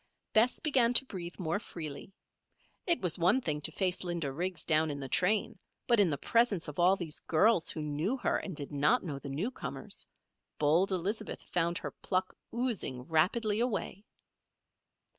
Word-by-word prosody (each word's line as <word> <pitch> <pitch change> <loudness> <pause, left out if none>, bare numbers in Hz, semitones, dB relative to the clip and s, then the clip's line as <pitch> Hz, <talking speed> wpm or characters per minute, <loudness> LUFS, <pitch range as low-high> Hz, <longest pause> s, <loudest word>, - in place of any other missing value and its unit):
Bess 230 +3 +4
began 250 -5 +3
to 270 - +6
breathe 180 -7 -7
more 175 +1 -1
freely. 160 -4 -7 0.8
It 340 -1 +2
was 180 -1 0
one 185 +9 +4
thing 150 - -2
to - - -1
face 185 -2 0
Linda 170 -5 -2
Riggs 175 +3 -3
down 155 0 +3
in 145 -1 -3
the 135 - -5
train; 185 - +1 0.3
but 235 -2 +4
in 195 -4 +5
the 145 - -1
presence 230 - +1
of 150 +2 -7
all 180 +2 +5
these 170 -5 -3
girls 175 +2 +3
who 155 - -1
knew 155 - -1
her - - 0
and 190 - -6
did 145 0 -4
not 150 - +2
know 145 -6 -5
the 140 - -8
newcomers 185 - -4 0.5
bold 165 +7 +3
Elizabeth 200 +4 -2
found 170 0 +1
her - - -5
pluck 185 0 -2 0.2
oozing 225 - -2
rapidly 205 - +1
away. 215 -4 -2
180 Hz, 170 wpm, -31 LUFS, 155-215 Hz, 0.8 s, to